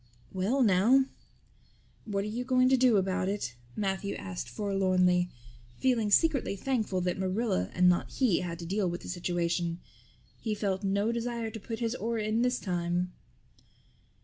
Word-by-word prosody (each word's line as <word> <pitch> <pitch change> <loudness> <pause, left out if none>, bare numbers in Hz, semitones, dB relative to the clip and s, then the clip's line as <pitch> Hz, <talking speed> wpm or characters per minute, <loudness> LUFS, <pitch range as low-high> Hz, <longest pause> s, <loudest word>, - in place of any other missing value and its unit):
"Well 210 +9 +1
now, 225 +7 +5 1.0
what 200 -2 -1
are - - -4
you 230 +4 -3
going 255 0 +3
to 265 - +5
do 250 -4 +4
about 190 -1 0
it?" 200 -12 -3 0.2
Matthew 200 -1 -2
asked 180 -3 -6
forlornly, 185 -3 +2 0.5
feeling 240 -5 +1
secretly 275 -2 +3
thankful 215 -4 -1
that 180 +1 -1
Marilla 190 - 0
and 180 0 +5
not 180 -1 +2
he 245 -10 +2
had 170 -2 -4
to 170 - -7
deal 190 +1 0
with 175 0 -4
the - - -10
situation. 175 -1 -1 0.6
He 220 -2 -2
felt 200 -1 -2
no 200 +3 +1
desire 235 -1 -3
to 220 - -7
put 225 +2 -5
his 230 0 0
oar 230 -1 -2
in 215 +1 0
this 250 0 +2
time. 175 -1 -1
200 Hz, 160 wpm, -30 LUFS, 180-230 Hz, 1.0 s, now